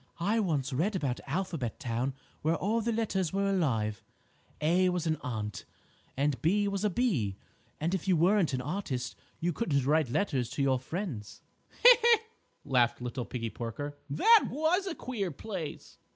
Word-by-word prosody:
"I 205 Hz, +7 st, +1 dB
once 150 Hz, -9 st, 0 dB
read 185 Hz, +10 st, 0 dB
about 135 Hz, -8 st, -1 dB
Alphabet 160 Hz, -, -3 dB
Town 125 Hz, +3 st, -2 dB, 0.3 s
where 160 Hz, +2 st, +2 dB
all 215 Hz, +6 st, 0 dB
the 235 Hz, +2 st, 0 dB
letters 205 Hz, -6 st, 0 dB
were 195 Hz, +1 st, 0 dB
alive, 120 Hz, -, 0 dB, 0.6 s
'A' 175 Hz, +4 st, +3 dB
was 180 Hz, -2 st, -1 dB
an 160 Hz, -1 st, +1 dB
Ant, 110 Hz, -4 st, -4 dB, 0.5 s
and 140 Hz, -3 st, 0 dB
'B' 205 Hz, +5 st, +2 dB
was 200 Hz, 0 st, -2 dB
a 210 Hz, -, +3 dB
Bee, 165 Hz, -, 0 dB, 0.4 s
and 165 Hz, +4 st, -1 dB
if 190 Hz, 0 st, -2 dB
you 185 Hz, -3 st, +4 dB
weren't 180 Hz, 0 st, +3 dB
an 130 Hz, -1 st, -1 dB
artist 130 Hz, -5 st, -3 dB, 0.2 s
you 175 Hz, +1 st, 0 dB
couldn't 140 Hz, -, 0 dB
write 150 Hz, -1 st, +2 dB
letters 130 Hz, -, 0 dB
to 140 Hz, +1 st, -2 dB
your 130 Hz, -2 st, +2 dB
friends." 130 Hz, -, -5 dB, 0.4 s
"He, -, -, +11 dB
he!" 470 Hz, -1 st, +6 dB, 0.5 s
laughed 125 Hz, -4 st, +2 dB
little 125 Hz, 0 st, -4 dB
Piggie 115 Hz, -3 st, -4 dB
Porker, 145 Hz, +5 st, -5 dB
"that 445 Hz, -, +5 dB
was 330 Hz, +7 st, +1 dB
a 350 Hz, -, -3 dB
queer 215 Hz, -7 st, -3 dB
place." 170 Hz, 0 st, -7 dB
160 Hz, 165 wpm, -30 LUFS, 130-200 Hz, 0.6 s, He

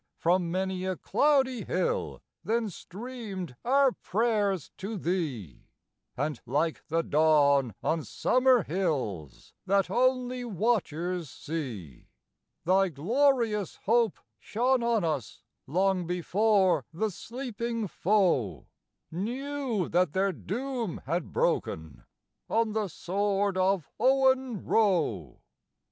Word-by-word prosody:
from 175 Hz, 0 st, +2 dB
many 185 Hz, +1 st, -2 dB
a 185 Hz, 0 st, -1 dB
cloudy 265 Hz, -, +2 dB
hill 485 Hz, 0 st, -2 dB, 0.2 s
then 225 Hz, -2 st, 0 dB
streamed 200 Hz, -, -7 dB
our 270 Hz, +1 st, +4 dB
prayers 205 Hz, -, 0 dB
to 205 Hz, +3 st, -5 dB
Thee, 150 Hz, -, -3 dB, 0.5 s
And 145 Hz, 0 st, -2 dB
like 150 Hz, +6 st, 0 dB
the 165 Hz, +1 st, 0 dB
dawn 140 Hz, -, +3 dB
on 160 Hz, -1 st, 0 dB
summer 255 Hz, -, +3 dB
hills, 135 Hz, -, -3 dB
that 195 Hz, -1 st, +2 dB
only 255 Hz, +1 st, +1 dB
watchers 180 Hz, -, -1 dB
see, 120 Hz, -, -6 dB, 0.6 s
Thy 190 Hz, +2 st, +3 dB
glorious 220 Hz, -, +1 dB
hope 230 Hz, -1 st, +2 dB, 0.2 s
shone 250 Hz, +3 st, +1 dB
on 235 Hz, -4 st, +1 dB
us 155 Hz, -9 st, -3 dB, 0.2 s
long 185 Hz, +2 st, +1 dB
before 185 Hz, -, +2 dB
the 210 Hz, +6 st, -1 dB
sleeping 230 Hz, 0 st, -4 dB
foe 180 Hz, -, +1 dB, 0.5 s
Knew 245 Hz, -, -2 dB
that 180 Hz, -2 st, +1 dB
their 195 Hz, +1 st, +2 dB
doom 235 Hz, -, -4 dB
had 165 Hz, +4 st, -2 dB
broken 80 Hz, -2 st, -1 dB, 0.4 s
on 225 Hz, -1 st, +1 dB
the 215 Hz, -2 st, 0 dB
sword 200 Hz, +3 st, -1 dB
of 185 Hz, -4 st, +1 dB
Owen 260 Hz, -2 st, +2 dB
Roe. 155 Hz, -, +1 dB
195 Hz, 105 wpm, -28 LUFS, 165-235 Hz, 0.6 s, our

